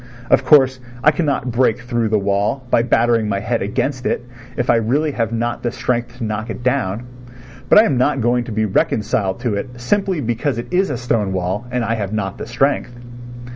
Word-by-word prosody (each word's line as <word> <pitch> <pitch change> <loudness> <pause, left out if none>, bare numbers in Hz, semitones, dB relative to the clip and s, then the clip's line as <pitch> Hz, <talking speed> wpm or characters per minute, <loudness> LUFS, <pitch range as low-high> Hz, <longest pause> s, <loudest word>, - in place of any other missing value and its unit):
Of 130 - +5
course 130 -2 +5 0.2
I 150 - +6
cannot 145 -5 -1
break 120 -1 +2
through 120 -2 -1
the 110 - +2
wall 100 +6 0
by - - +4
battering 115 -2 +2
my 100 -1 0
head 115 +3 -1
against 125 +6 -2
it 120 - -1 0.3
if 125 - -1
I 120 - +4
really 140 +8 +1
have 115 -4 -2
not 120 +1 -2
the 120 - -1
strength 120 0 -2
to 120 - -5
knock 110 +1 -3
it 120 - -6
down, 120 -5 0 0.7
but - - +7
I 215 - +9
am 140 - +1
not 135 +2 +2
going 120 +1 +1
to 115 - -7
be 110 0 0
reconciled 105 +1 0
to 120 -4 -1
it 120 +4 -5
simply 190 +6 0
because 120 +1 -1
it 120 - -6
is 190 +2 +2
a 140 - -2
stone 115 -5 -1
wall 95 +5 -2
and 125 -1 -1
I 115 - 0
have 105 -2 -3
not 100 -3 -3
the - - -6
strength. 120 0 0
120 Hz, 210 wpm, -19 LUFS, 110-130 Hz, 0.7 s, I